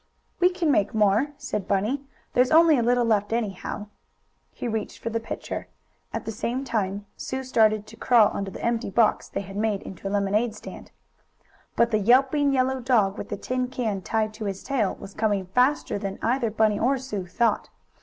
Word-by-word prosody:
"We 360 - +5
can 360 -4 0
make 205 -5 +1
more," 210 +5 +3
said 205 -3 -4
Bunny. 210 +8 0 0.3
"There's 250 +1 +4
only 325 0 +6
a 250 - +2
little 245 +1 +2
left, 210 -2 +1
anyhow." 210 -2 -3 0.7
He - - -5
reached 220 -2 -3
for 230 - -5
the 230 - 0
pitcher. 225 - -6 0.4
At - - -4
the 225 - -3
same 240 +4 -2
time 205 -5 -2
Sue 260 0 -4
started 215 -4 +3
to 215 +1 -13
crawl 230 -3 +5
under 195 -1 -3
the - - -7
empty 235 -1 0
box 220 +2 +2
they - - -3
had 195 0 -9
made 210 -1 0
into 195 +1 -7
a - - -1
lemonade 205 +3 +1
stand. - - -10 0.9
But 235 0 +3
the 215 - +2
yelping, 270 +6 +4
yellow 260 0 +1
dog, 230 -5 +2
with - - -6
the - - -3
tin 255 0 -2
can 225 -6 -2
tied 215 +2 -1
to 215 0 -6
his 195 -1 -4
tail, 250 -8 0
was 195 - -11
coming 205 -3 0
faster 250 +3 +1
than 195 -1 -4
either 240 0 +1
Bunny 215 -1 +2
or 270 +4 +2
Sue 210 -8 -5
thought. 225 +4 0
225 Hz, 195 wpm, -25 LUFS, 205-250 Hz, 0.9 s, only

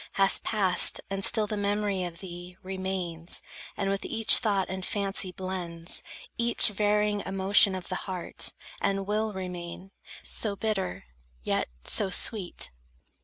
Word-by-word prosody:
Hast 195 0 +3
passed; 195 -5 +5
and 195 0 -3
still 215 +1 +6
the 210 - -4
memory 205 -1 -1
of 170 -1 -9
thee 180 -1 -9
Remains, 185 -3 -5 0.3
and 195 -1 -1
with 195 - -3
each 225 -1 +5
thought 200 -5 0
and 190 0 -6
fancy 195 -1 -2
blends 180 -2 -5 0.4
Each 235 0 +6
varying 210 0 0
emotion 195 0 +3
of 185 -2 -7
the - - -5 0.2
heart; 185 -2 -4 0.3
And 195 0 -1
will 215 +2 -1
remain, 180 -1 -8 0.3
so 210 -3 -2
bitter, 195 - -3 0.4
yet - - -1
so 200 - +2
sweet! 180 - +3
195 Hz, 135 wpm, -27 LUFS, 180-205 Hz, 0.4 s, still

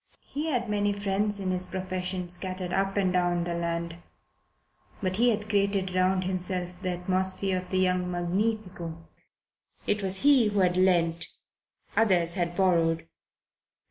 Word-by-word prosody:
He 295 +3 -4
had 245 -6 0
many 205 -1 +1
friends 200 +1 0
in 190 -1 -1
his 185 0 0
profession, 185 -1 -3
scattered 185 0 -4
up 195 +1 0
and 190 -2 +2
down 175 -1 +1
the 170 0 -2
land. 170 0 -2 1.0
But 185 -1 -1
he 240 +2 +5
had 215 -2 -1
created 200 -3 +1
round 185 0 +2
himself 180 -1 -3
the 185 - -2
atmosphere 185 +1 0
of 180 0 -10
the 185 - 0
young 180 -1 +2
magnifico. 180 -1 -2 0.9
It 210 - +1
was 190 +2 -1
he 275 -6 +6
who 205 -1 +1
had 180 -1 +3
lent, 170 -3 +2 0.7
others 180 -6 +3
who 185 - -5
had 175 0 -1
borrowed. 165 -3 +2
185 Hz, 150 wpm, -28 LUFS, 180-200 Hz, 1.0 s, he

